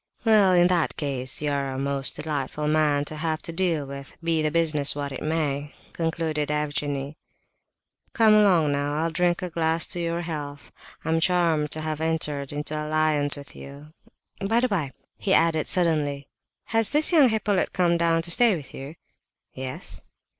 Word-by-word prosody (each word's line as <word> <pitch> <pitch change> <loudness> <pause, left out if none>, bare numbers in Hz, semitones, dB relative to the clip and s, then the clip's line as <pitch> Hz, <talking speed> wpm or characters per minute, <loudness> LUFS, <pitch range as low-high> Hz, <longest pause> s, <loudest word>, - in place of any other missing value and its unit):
"Well, 210 -4 +5
in 175 0 +4
any 175 -3 +2
case, 135 -1 -2
you 150 - 0
are 140 -1 -2
a 130 - -5
most 135 -1 -1
delightful 150 -1 -3
man 150 -2 +2
to 155 - -6
have 155 0 -2
to - - -4
deal 165 -4 -1
with, 140 0 -9
be 165 -1 +1
the 155 - +1
business 155 -3 +3
what 145 -1 -4
it 135 - -7
may," 150 -2 -2 0.2
concluded 160 -2 -2
Evgenie. 145 -1 -2 1.0
"Come 220 -2 +5
along 185 -8 +4
now, 145 +1 -1
I'll 165 +2 -1
drink 175 +1 0
a 180 - -4
glass 165 0 +2
to 180 - -1
your 170 0 -2
health. 145 -4 -6 0.3
I'm 160 +1 +1
charmed 165 -3 +1
to 155 - -4
have 155 0 -3
entered 150 -4 -1
into 150 +1 -4
alliance 155 -2 +1
with 140 0 -11
you. 145 +2 -12 0.5
By 225 +4 +2
the 255 - +2
by," 170 - -2 0.3
he 195 - +2
added 165 -2 +2
suddenly, 150 -6 +1 0.5
"has 225 -1 +3
this 300 +3 +4
young 300 -7 +6
Hippolyte 210 -3 0
come 175 -2 +1
down 165 -1 +1
to 170 - -1
stay 230 +2 +5
with 150 -5 -9
you?" 140 +4 -8 0.6
"Yes." 130 0 -6
155 Hz, 175 wpm, -24 LUFS, 145-170 Hz, 1.0 s, young